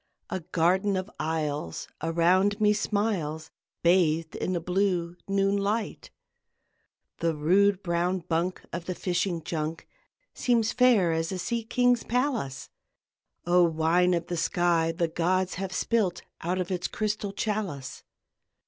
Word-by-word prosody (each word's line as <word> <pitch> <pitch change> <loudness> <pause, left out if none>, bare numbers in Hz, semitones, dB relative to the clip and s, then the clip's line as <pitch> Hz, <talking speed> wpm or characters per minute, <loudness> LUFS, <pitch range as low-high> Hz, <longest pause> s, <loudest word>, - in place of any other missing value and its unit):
A - - -1
garden 185 +4 +1
of 185 +2 -4
isles 150 - -2
around 180 +5 +2
me 210 -1 +4
smiles, 200 -8 -1 0.3
Bathed 165 -2 +3
in 185 - -2
the 175 - 0
blue 180 -1 0
noon 195 0 +2
light, 205 +2 -2 1.1
The 165 -1 0
rude 190 +6 +3
brown 175 +1 0
bunk 170 +2 -2
of 170 0 -4
the 185 - -3
fishing 175 -2 -1
junk 160 0 -4 0.5
Seems 235 -2 +1
fair 240 -9 +4
as 165 +1 -1
a 190 - -3
sea 235 +5 -2
king's 245 +1 +2
palace: 240 - -2 0.7
O 175 +1 +4
wine 170 +2 +3
of 170 -1 -2
the 175 0 -4
sky 170 -1 +2
the 170 0 0
gods 180 +3 0
have 190 -1 -3
spilt 190 -5 0 0.2
Out 180 +2 -1
of 185 0 -3
its 180 -1 -1
crystal 210 -1 -2
chalice! 195 -11 -3
180 Hz, 135 wpm, -27 LUFS, 165-200 Hz, 1.1 s, me